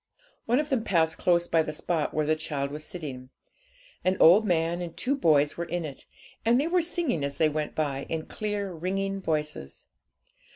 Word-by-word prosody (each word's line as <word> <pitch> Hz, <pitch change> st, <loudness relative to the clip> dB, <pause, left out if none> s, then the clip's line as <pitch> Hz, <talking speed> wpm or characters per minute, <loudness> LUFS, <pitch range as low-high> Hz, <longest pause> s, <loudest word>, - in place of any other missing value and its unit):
One 240 Hz, +4 st, +3 dB
of 300 Hz, 0 st, -2 dB
them 255 Hz, -5 st, +1 dB
passed 165 Hz, -5 st, +1 dB
close 175 Hz, -1 st, +2 dB
by 165 Hz, -, +3 dB
the 155 Hz, -, -3 dB
spot 155 Hz, 0 st, -1 dB
where 155 Hz, 0 st, 0 dB
the 155 Hz, +1 st, +2 dB
child 145 Hz, -3 st, -3 dB
was 150 Hz, +1 st, -7 dB
sitting. 135 Hz, -7 st, -7 dB, 0.7 s
An 185 Hz, +1 st, +2 dB
old 200 Hz, +7 st, +7 dB
man 170 Hz, 0 st, +1 dB
and 170 Hz, -2 st, -6 dB
two 275 Hz, +3 st, +1 dB
boys 150 Hz, -, +3 dB
were 170 Hz, -, -2 dB
in 170 Hz, 0 st, -3 dB
it, 140 Hz, -3 st, -9 dB, 0.4 s
and 235 Hz, +2 st, +4 dB
they 285 Hz, -, +1 dB
were 350 Hz, +2 st, +2 dB
singing 325 Hz, -, -1 dB
as 140 Hz, 0 st, -3 dB
they 155 Hz, 0 st, +4 dB
went 150 Hz, 0 st, -3 dB
by, 140 Hz, -3 st, -2 dB
in 160 Hz, -1 st, -3 dB
clear, 205 Hz, -3 st, -3 dB
ringing 195 Hz, +3 st, -2 dB
voices. 150 Hz, -, -3 dB
165 Hz, 195 wpm, -27 LUFS, 150-195 Hz, 0.7 s, old